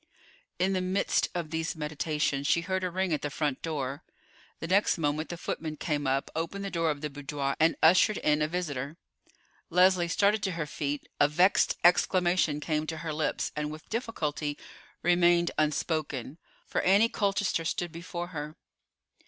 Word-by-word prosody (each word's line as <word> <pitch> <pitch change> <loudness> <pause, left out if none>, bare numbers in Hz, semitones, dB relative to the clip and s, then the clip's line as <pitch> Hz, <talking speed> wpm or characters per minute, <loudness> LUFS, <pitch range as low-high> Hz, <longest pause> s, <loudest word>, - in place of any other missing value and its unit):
In 190 +2 +1
the 185 - 0
midst 185 +2 +1
of 165 -3 -3
these 160 +1 -2
meditations 150 -2 -1
she 170 - +3
heard 190 +2 -2
a 185 - 0
ring 185 -1 -1
at 150 - -1
the 145 - -2
front 145 -2 -2
door. 140 -4 -3 0.5
The - - -6
next 190 +4 +3
moment 155 0 -1
the 175 - -5
footman 155 -2 -4
came 145 -3 -1
up, 135 +1 0
opened 170 +5 -3
the 195 - -4
door 165 -2 +1
of 145 -2 -2
the 150 - -3
boudoir, 140 0 -3
and 160 +1 +4
ushered 185 +5 +5
in 150 0 +2
a 150 - +2
visitor. 155 -4 -4 0.7
Leslie 180 0 +4
started 200 +5 +2
to 195 -2 -1
her 165 -2 -2
feet, 145 -1 -4
a 145 - +6
vexed 180 +6 +3
exclamation 175 -3 +3
came 155 0 -1
to 160 - -4
her 155 - -2
lips, 150 0 -1
and 150 0 -2
with 155 +1 -10
difficulty 155 - -2 0.5
remained 175 0 +4
unspoken, 150 -2 -1 0.3
for - - -1
Annie 200 +5 +5
Colchester 200 -5 0
stood 175 +1 -2
before 175 +1 -6
her. 150 -2 -6
160 Hz, 170 wpm, -29 LUFS, 150-180 Hz, 0.7 s, a